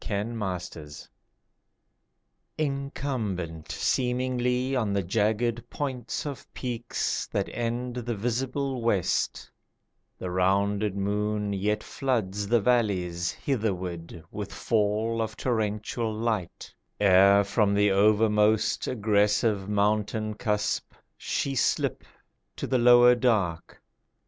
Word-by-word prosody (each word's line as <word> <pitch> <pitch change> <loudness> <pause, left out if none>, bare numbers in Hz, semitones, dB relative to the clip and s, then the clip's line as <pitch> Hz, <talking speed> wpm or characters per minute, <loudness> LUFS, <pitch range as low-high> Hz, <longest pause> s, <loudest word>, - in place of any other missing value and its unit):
THE 100 -2 -1
NIGHT 105 -6 -3
FOREST 75 -2 -11 1.5
Incumbent 130 - -3
seemingly 125 +1 0
On 110 -6 0
the 100 -1 0
jagged 110 +5 0
points 130 -4 -4
of 140 -3 -7
peaks 120 -2 -2
That - - -2
end 120 +1 -3
the 120 -1 -3
visible 130 +4 -2
west, 105 -6 0 0.7
The 90 - -5
rounded 100 +2 +1
moon 105 +1 -1
yet 105 +2 -1
floods 105 -7 -2
The 120 +2 +4
valleys 95 -7 +1
hitherward 90 - -3
With 105 -1 -6
fall 110 +1 0
of 110 0 -4
torrential 110 -1 -1
light, 110 -5 -3 0.3
Ere 100 0 +6
from 100 0 +1
the 105 0 +4
overmost 105 +1 +3
Aggressive 105 -2 +1
mountain 105 +1 0
cusp, 105 -1 -1 0.2
She 140 - -2
slip 130 - 0 0.5
to - - -4
the 130 - +1
lower 120 0 +7
dark. 105 -10 0
105 Hz, 105 wpm, -27 LUFS, 100-120 Hz, 1.5 s, lower